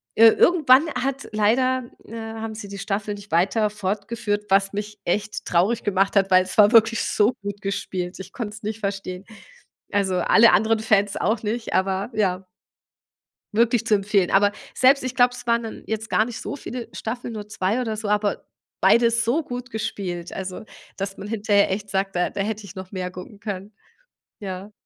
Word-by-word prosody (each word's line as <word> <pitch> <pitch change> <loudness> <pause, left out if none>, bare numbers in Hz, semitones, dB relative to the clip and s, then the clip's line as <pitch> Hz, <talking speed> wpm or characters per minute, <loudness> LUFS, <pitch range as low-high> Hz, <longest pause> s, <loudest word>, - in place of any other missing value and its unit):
ir 225 0 +7
irgendwann 310 -3 +5
hat 270 +2 -2
leider 245 +4 +2 0.2
äh, - - -12
haben 225 -1 -6
sie 210 -2 -7
die 200 - -8
Staffel 200 +1 -3
nicht 205 -2 -13
weiter 200 +6 +2
fortgeführt, 210 +1 -3
was 195 0 +3
mich 210 0 -5
echt 210 +4 -2
traurig 195 +7 +1
gemacht 195 0 +1
hat, 195 -1 +3
weil 185 0 +6
es 185 - -8
war 210 0 +7
wirklich 230 -1 +5
so 210 +4 +2
gut 200 0 -6
gespielt. 185 -2 -4
Ich 190 - -9
konnte 215 -4 -5
es 220 - -13
nicht 215 +1 -4
verstehen. 195 -2 -4 0.7
Also, 195 -2 +1
alle 220 +5 +5
anderen 220 +4 +3
Fans 205 -2 +2
auch 220 +4 0
nicht, 225 +2 -3
aber 190 +2 0
ja. 190 -3 0 1.1
Wirklich 230 0 +2
zu 215 - +4
empfehlen. 200 -2 +1
Aber 205 +1 +5 0.2
selbst 260 +1 +4
ich 255 - -3
glaube, 245 -1 +4
es 245 - -10
waren 235 0 +2
dann 225 - -8
jetzt 220 0 -4
gar 215 - +3
nicht 235 -1 -7
so 285 - -5
viele 245 -3 -7
Staffeln, 240 +1 -5
nur 210 -1 -6
2 210 +3 -1
oder 225 -3 -2
so, 215 -1 -4
aber 210 0 0 0.4
beide 235 0 +5
so 235 +7 +1
gut 250 -1 -6
gespielt, 180 -6 -4
also 190 +1 -6 0.3
dass 195 0 -4
man 205 - -7
hinterher 205 -2 +2
echt 200 +2 -3
sagt: 195 0 -1
„Da 180 - +1
da - - -5
hätte 210 +1 -3
ich 200 0 -11
noch 185 -1 -8
mehr 185 -2 -4
gucken 185 +3 -10
können." 200 -1 -6 0.7
Ja. 195 +1 -7
210 Hz, 190 wpm, -23 LUFS, 195-225 Hz, 1.1 s, ir